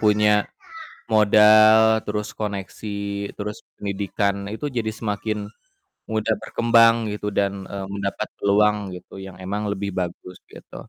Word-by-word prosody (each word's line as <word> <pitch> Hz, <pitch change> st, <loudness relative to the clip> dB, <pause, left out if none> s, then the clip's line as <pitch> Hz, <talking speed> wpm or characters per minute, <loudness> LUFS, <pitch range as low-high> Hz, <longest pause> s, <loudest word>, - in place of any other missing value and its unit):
punya 105 Hz, -1 st, +3 dB, 0.7 s
modal, 110 Hz, +1 st, +6 dB
terus 105 Hz, 0 st, -3 dB
koneksi, 100 Hz, 0 st, -5 dB
terus 105 Hz, 0 st, -5 dB, 0.2 s
pendidikan, 100 Hz, 0 st, -2 dB
nah, -, -, -6 dB
itu 145 Hz, +2 st, -4 dB
jadi 115 Hz, -3 st, -2 dB
semakin 105 Hz, -1 st, -4 dB, 0.6 s
mudah 110 Hz, 0 st, 0 dB
berkembang 115 Hz, -1 st, +4 dB
gitu 105 Hz, 0 st, -4 dB
dan, 100 Hz, -1 st, -1 dB
eee, 100 Hz, -1 st, -5 dB
mendapat 100 Hz, +2 st, -3 dB
peluang 105 Hz, 0 st, +2 dB
gitu 95 Hz, +2 st, -11 dB
yang 95 Hz, -1 st, -10 dB
emang 100 Hz, +3 st, -3 dB
lebih 100 Hz, -1 st, -4 dB
bagus 90 Hz, 0 st, -5 dB
gitu. -, -, -12 dB
105 Hz, 125 wpm, -22 LUFS, 100-110 Hz, 0.7 s, modal